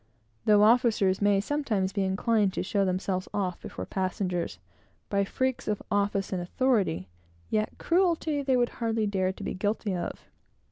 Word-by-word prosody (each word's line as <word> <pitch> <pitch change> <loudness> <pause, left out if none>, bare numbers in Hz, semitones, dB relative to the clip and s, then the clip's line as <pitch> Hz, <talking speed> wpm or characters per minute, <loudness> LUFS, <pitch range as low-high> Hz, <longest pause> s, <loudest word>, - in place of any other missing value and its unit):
Though 210 -1 +6
officers 215 -5 +4
may 205 -1 +4
sometimes 215 -6 -1
be 200 - 0
inclined 200 +1 +1
to - - -2
show 200 +1 +1
themselves 185 0 -1
off 185 -3 -2
before - - -6
passengers, 185 -2 -2 0.5
by 200 -1 +2
freaks 260 +5 -2
of 210 -1 -1
office 200 -1 0
and 180 - -1
authority, 195 - +1 0.4
yet 215 0 0
cruelty 335 -4 +1
they 265 -2 +2
would 240 -1 +2
hardly 225 -1 +1
dare 190 -2 0
to - - -10
be - - -3
guilty 205 0 -1
of. 175 - -5
205 Hz, 155 wpm, -28 LUFS, 190-230 Hz, 0.5 s, Though